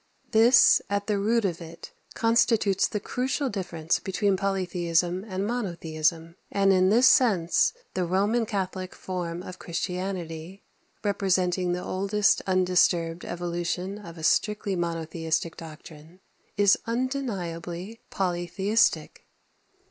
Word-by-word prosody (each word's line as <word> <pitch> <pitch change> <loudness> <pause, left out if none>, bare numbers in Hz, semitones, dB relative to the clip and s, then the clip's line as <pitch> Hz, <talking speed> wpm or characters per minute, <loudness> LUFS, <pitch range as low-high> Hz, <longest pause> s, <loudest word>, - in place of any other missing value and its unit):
This, 230 +3 +6
at 200 0 -1
the 205 -1 0
root 225 +2 +1
of 175 -3 -2
it, 165 0 -10 0.2
constitutes 225 -4 +2
the 210 - -3
crucial 260 +6 -2
difference 170 -5 -2
between 195 +1 0
polytheism 180 -2 0
and 190 0 -3
monotheism; 165 -6 -2
and 195 -1 +3
in 185 0 +4
this 240 +5 +5
sense 210 -10 +4 0.2
the 185 - -1
Roman 205 +6 +1
Catholic 185 -3 -4
form 175 -2 -5
of 185 0 -9
Christianity, 180 0 -5 0.4
representing 185 -3 +1
the 180 - -3
oldest 200 +2 +1
undisturbed 180 -2 +2
evolution 175 +3 -3
of 170 -5 -11
a 160 - -9
strictly 210 +3 +1
monotheistic 165 -1 -2
doctrine, 160 +1 -12 0.4
is 200 -1 +4
undeniably 220 -6 -4
polytheistic. 190 +4 0
185 Hz, 110 wpm, -26 LUFS, 170-205 Hz, 0.4 s, This